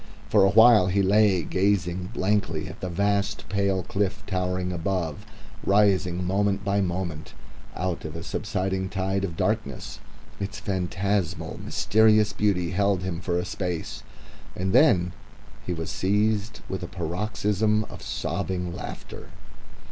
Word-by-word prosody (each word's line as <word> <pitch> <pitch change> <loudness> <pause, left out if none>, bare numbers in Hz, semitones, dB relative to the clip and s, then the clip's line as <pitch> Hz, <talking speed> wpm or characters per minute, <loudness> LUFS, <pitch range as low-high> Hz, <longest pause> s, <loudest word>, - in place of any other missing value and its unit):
For 105 -2 +5
a 95 - +5
while 110 -2 +7
he 100 +1 +2
lay, 100 -2 +4
gazing 90 -1 0
blankly 95 -7 0
at - - -9
that 90 - -3
vast 100 +3 0
pale 100 -1 +1
cliff 100 +1 -2
towering 90 -1 -1
above, 85 -3 -2 0.4
rising 95 -3 +2
moment 100 +1 +1
by 100 0 +2
moment 85 -4 -3 0.4
out 90 -1 -2
of 80 0 -6
a 85 - -5
subsiding 95 -2 -2
tide 95 0 -1
of 85 -4 -3
darkness. 105 - -2 0.4
Its 100 +1 -4
phantasmal, 95 -1 -2
mysterious 110 -1 +3
beauty 90 -5 +1
held 100 -1 +1
him 90 -2 -3
for 90 -3 -1
a 90 - -1
space, 90 -3 -4 0.5
and 95 +2 -1
then 95 - +4 0.5
he 90 - 0
was 80 0 -4
seized 105 +2 0
with 95 - -4
a 90 - -4
paroxysm 100 +4 0
of - - -11
sobbing 90 -2 -3
laughter... - - -8
95 Hz, 135 wpm, -25 LUFS, 90-100 Hz, 0.5 s, while